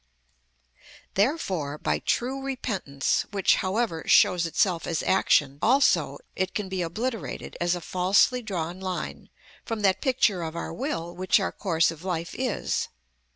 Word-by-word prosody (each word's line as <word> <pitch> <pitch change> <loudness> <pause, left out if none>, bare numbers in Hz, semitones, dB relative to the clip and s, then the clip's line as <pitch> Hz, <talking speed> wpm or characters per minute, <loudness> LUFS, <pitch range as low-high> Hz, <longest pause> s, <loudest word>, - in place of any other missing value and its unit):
Therefore, 190 - 0
by - - -1
true 265 +3 -1
repentance, 210 - -1
which, 200 -2 +3
however, 190 -4 -1
shows 175 -2 +5
itself 170 +1 +1
as 165 - -1
action 145 -7 +2
also, 270 +5 +3 0.2
it 190 0 -2
can 205 -3 -2
be 190 -1 -2
obliterated, 210 - -4
as 175 +1 +2
a 175 - -6
falsely 190 +9 +3
drawn 180 -5 -4
line, 185 -2 -5 0.3
from 225 -2 -4
that 195 -1 +2
picture 250 - +2
of 160 0 -5
our 170 - -4
will 175 - -4
which 185 +3 +3
our 195 - -1
course 170 -4 +1
of 165 0 -11
life 170 -2 -3
is. 255 -3 -1
185 Hz, 145 wpm, -26 LUFS, 170-225 Hz, 0.3 s, shows